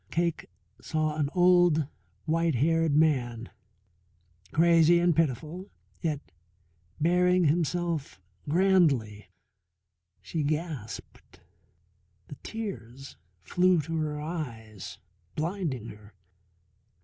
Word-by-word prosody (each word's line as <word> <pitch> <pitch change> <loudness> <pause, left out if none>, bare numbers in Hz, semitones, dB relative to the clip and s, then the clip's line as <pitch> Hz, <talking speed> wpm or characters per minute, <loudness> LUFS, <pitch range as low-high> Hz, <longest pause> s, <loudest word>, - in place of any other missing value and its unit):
Cake 170 -1 -1 0.3
saw 155 -1 -1
an 145 -2 0
old 175 -4 +5 0.4
white 165 -1 +1
haired 165 +3 +2
man, 125 -7 +1 1.0
crazy 170 0 +5
and 170 -1 +3
pitiful, 165 - -1 0.3
yet 155 -4 -3 0.7
bearing 180 +2 +3
himself 165 - 0 0.3
grandly. 145 - +2 0.9
She 165 - -4
gasped, 150 -6 -5 0.9
the - - -7
tears 135 - -7 0.3
flew 180 - +3
to 165 +3 -5
her 150 -1 -2
eyes, 120 - -6 0.4
blinding 155 - -3
her. 105 -1 -14
155 Hz, 85 wpm, -28 LUFS, 135-175 Hz, 1.0 s, old